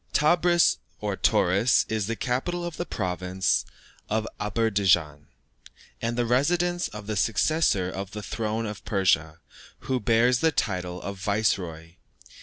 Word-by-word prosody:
Tebris, 175 +3 +4 0.2
or - - -2
Tauris, 100 +7 +3
is 110 -3 -2
the 115 - -2
capital 155 +10 -2
of 170 -2 -6
the 175 - -4
province 95 -1 -1 0.4
of 110 +1 0
Aderbeidschan, 95 -9 +1 0.7
and 115 +1 -2
the 120 - +1
residence 175 +8 +1
of 105 -1 -9
the 110 +1 -3
successor 105 - +1
to 95 +1 -4
the 105 0 -7
throne 110 +1 -3
of 105 -2 -6
Persia, 85 -5 +1 0.4
who 130 -1 -1
bears 120 +3 +3
the 160 0 +3
title 90 -8 -2
of 100 0 -6
Viceroy. 90 -5 -1
105 Hz, 135 wpm, -26 LUFS, 95-125 Hz, 0.7 s, Tebris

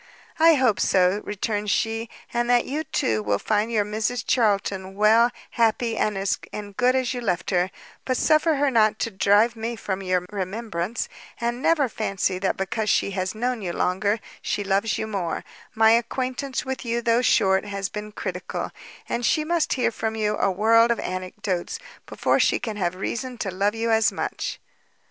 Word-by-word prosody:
"I 325 0 +7
hope 255 -6 +2
so," 185 +2 +3
returned 210 0 -2
she; 225 +2 0 0.2
"and 240 0 0
that 245 -1 +4
you 300 +3 -2
too, 110 -1 0
will 105 -1 0
find 215 - 0
your 210 -3 +2
Mrs 220 +3 -2
Charlton 195 -4 +1
well, 220 +3 +5 0.2
happy, 230 0 +1
and 195 -3 -1 0.5
good 250 +3 +3
as 260 -1 0
you 245 - -4
left 200 -5 -1
her; 180 0 +2 0.3
but 255 -1 -1
suffer 310 0 +3
her 285 0 +2
not 215 -3 +3
to 230 - -2
drive 205 +4 +3
me 230 +1 -3
from 195 -3 -4
your 185 -1 0
remembrance, 205 0 -3 0.3
and 240 +1 -2
never 300 -3 +3
fancy 195 -4 -1
that 190 - 0
because 210 +3 -2
she 200 - +2
has 185 +1 -2
known 245 +1 -1
you 175 -3 -3
longer, 200 +5 0 0.2
she 205 - -2
loves 200 +2 +1
you - - -2
more; 195 -6 -3 0.3
my 220 0 +6
acquaintance 255 +3 -1
with 265 0 -4
you, 235 0 -1
though 230 +1 +3
short, 190 -5 +3
has 200 -1 -3
been 210 +1 -7
critical, - - -4 0.4
and 240 - -2
she 305 +6 +2
must 335 +1 +1
hear 250 -3 +1
from 220 0 -3
you 210 -1 0
a - - +2
world 225 +4 +4
of 235 - +1
anecdotes, 185 0 -3 0.3
before - - +1
she - - +3
can 220 -3 -4
have 185 -3 -1
reason 245 +6 -4
to 200 -4 -3
love 200 +4 0
you 230 0 0
as 220 -1 +4
much." - - -4
220 Hz, 180 wpm, -24 LUFS, 195-235 Hz, 0.5 s, I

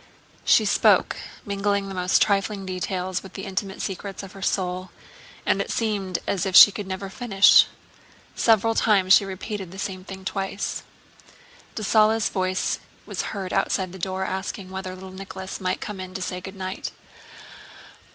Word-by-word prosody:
She - - +5
spoke, - - +4 0.3
mingling 200 -1 -1
most 180 0 +3
trifling 200 -1 0
details 185 0 -2
with 190 - -12
the 195 - -6
intimate 195 0 -4
secrets 195 +1 -5
of 195 - -9
her 195 - -12
soul, 185 -1 -1 0.6
and - - +2
it - - -4
seemed 200 -5 -1
as 195 - -1
if 190 -2 -1
she 205 - +11
could 205 -1 -6
never 190 +1 -4
finish. 200 -1 +5 0.7
Several 225 0 +3
times 195 -4 +4
she 200 - +6
repeated 195 0 -5
the 190 - -10
same 190 -1 -4
thing 190 0 -9
twice. 195 +1 -3 0.9
Dessalles' 220 +1 +3
voice 185 -1 -1 0.3
was - - -3 0.2
heard 190 -2 -4
outside 190 -1 0
the 190 - -10
door 190 +1 -2
asking 190 0 -4
whether 190 -1 -5
little 190 0 -10
Nicholas 190 0 -7
might 185 -1 -1
come 210 -2 -5
in 185 0 -7
to 190 - -4
say 180 0 -4
good 190 +2 -9
night. 190 0 -4
190 Hz, 160 wpm, -24 LUFS, 185-200 Hz, 0.9 s, she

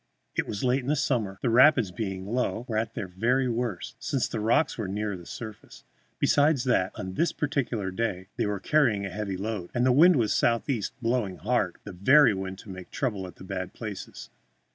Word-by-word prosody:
It - - -1
was 100 - -4
late 130 +1 +3
in 125 - -9
the 150 - +2
summer, 125 -8 0
and - - -19
the 120 - +2
rapids, 125 -4 +5
being 95 -1 -4
low, 120 +1 -1
were 110 - -3
at 110 +1 -1
their 95 - -3
very 120 +9 +1
worst, 120 -5 -3
since 135 - -1
the 115 - -4
rocks 115 +8 +2
were 110 -4 -3
nearer 105 +1 -2
the 85 -2 -11
surface. 110 -2 -9 0.3
Besides 145 -2 +3
that, 120 -8 +2
on 95 0 -5
this 170 - +1
particular 125 -9 -2
day 95 -3 -2
they - - 0
were 105 -1 -2
carrying 115 -4 +2
a 95 - -5
heavy 100 -1 -3
load, 100 -3 -4
and 120 +1 +2
the 130 - +5
wind 165 +7 +7
was 115 -6 +2
southeast, 115 -2 0
blowing 115 -6 0
hard 105 -4 0
the 100 - -8
very 130 +9 +5
wind 95 0 -5
to - - -12
make 95 -1 -9
trouble 105 -8 -2
at 90 - -12
the - - -13
bad 95 -1 -5
places. 105 -4 -8
110 Hz, 210 wpm, -27 LUFS, 95-125 Hz, 0.3 s, wind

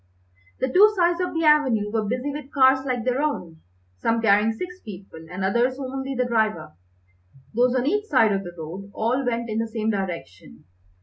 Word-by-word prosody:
The 260 - -1
two 420 +3 +7
sides 350 -1 +2
of 360 - -3
the 325 - 0
avenue 260 -9 +3
were 220 -1 0
busy 250 +6 -2
with 285 -1 -8
cars 265 -1 +4
like 250 -3 -1
their 255 +2 0
own, 180 - -3 0.4
some 230 - +1
carrying 215 0 +3
six 360 +11 -7
people, 185 -5 -11
and 185 +1 -3
others 240 +6 +1
only 270 0 -4
the 250 0 0
driver. 220 - -1 0.8
Those 245 +2 +2
on 255 0 +1
each 415 +8 0
side 255 - +3
of 195 -1 -1
the 175 -1 -9
road 175 +5 -8
all 245 +5 0
went 235 -1 -2
in 220 0 -2
the 230 - -1
same 220 0 -2
direction. 165 - -6
235 Hz, 190 wpm, -24 LUFS, 205-270 Hz, 0.8 s, two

